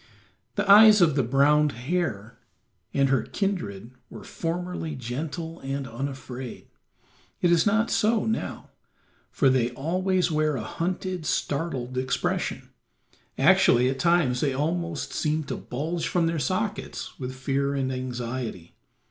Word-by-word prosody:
The 205 -1 -1
eyes 210 +1 +9
of 165 -4 +5
the 140 - +3
brown 140 +4 +3
hare 125 - -3 0.5
and 140 -1 +2
her 135 -2 +3
kindred 120 - -3 0.2
were - - -10
formerly 170 -2 -4
gentle 155 +7 -5
and 135 0 -4
unafraid. 130 0 -6 0.7
It 175 - +3
is 170 +3 +4
not 225 +3 +2
so 220 +1 +2
now, 225 - -3 0.6
for 140 - +2
they 130 -2 +3
always 180 +6 0
wear 155 -1 +1
a 115 - -3
hunted, 180 - -3
startled 135 -4 -2
expression; 130 -1 -2 0.7
actually 125 +1 +5
at 135 - -5
times 160 -6 +2
they 140 -3 +1
almost 165 +3 -2
seem 155 +1 0
to 140 - -4
bulge 160 +6 -3
from 175 -2 +1
their 165 -1 0
sockets 200 +9 -3
with 130 -1 -5
fear 140 +1 -1
and 130 -1 -1
anxiety. 125 -7 -5
145 Hz, 130 wpm, -26 LUFS, 130-175 Hz, 0.7 s, eyes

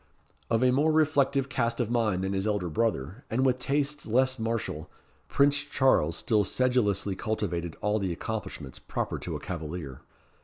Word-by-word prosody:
Of 115 +1 +2
a 130 - +5
more 145 +5 +3
reflective 140 -3 +2
cast 115 -2 -1
of 120 -2 0
mind 110 -6 +1
than 95 +1 -1
his 95 +2 -1
elder 100 -5 0
brother, 100 - -1
and 130 +4 +1
with 130 -1 +2
tastes 145 +2 -1
less 130 +3 +2
martial, 110 -9 -3 0.4
Prince 140 0 +3
Charles 130 - +2
still 105 +1 +2
sedulously 105 -4 +1
cultivated 90 -6 -2
all 105 +1 +1
the 95 -3 -1
accomplishments, 85 - -5
proper - - -3
to - - -5
a - - -4
cavalier. 80 -5 -6
110 Hz, 160 wpm, -28 LUFS, 95-130 Hz, 0.4 s, a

